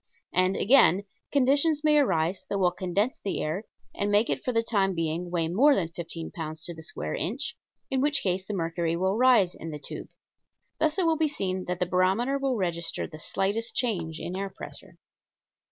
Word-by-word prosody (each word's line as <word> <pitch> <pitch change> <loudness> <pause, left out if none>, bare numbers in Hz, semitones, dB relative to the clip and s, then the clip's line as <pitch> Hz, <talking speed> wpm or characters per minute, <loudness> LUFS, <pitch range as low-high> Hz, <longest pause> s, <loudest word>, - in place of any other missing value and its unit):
And, 185 +1 +3
again, 200 -6 +5 0.3
conditions 285 +3 +3
may 300 -1 +5
arise 175 - +1
that 200 - -1
will 180 -2 +3
condense 185 +7 -1
the 200 - -3
air 170 +8 -2 0.3
and 205 - -1
make 205 +3 +3
it - - -2
for 255 - 0
the 230 -1 +1
time 195 -4 +1
being 165 +2 -2
weigh 170 -2 0
more 265 - +5
than 170 -4 -1
fifteen 165 -1 -6
pounds 155 -1 -6
to 175 - -5
the 160 - -11
square 160 - -4
inch, - - -3 0.4
in 265 -1 +1
which 285 0 +2
case 185 0 0
the 205 +2 -5
mercury 165 -1 -1
will 190 +3 +1
rise 245 -8 +5
in 165 - -8
the 150 - -5
tube. 150 - -7 0.7
Thus 315 0 +1
it 370 - +3
will 325 -1 +3
be 315 0 +2
seen 190 -9 -3
that 180 0 -2
the 180 - 0
barometer 190 +10 +1
will 270 -2 0
register 170 -3 -2
the 155 -2 -10
slightest 200 +7 -2
change 170 -10 -1
in 180 - -5
air 195 +1 -3
pressure. 190 - -11
190 Hz, 200 wpm, -27 LUFS, 170-245 Hz, 0.7 s, again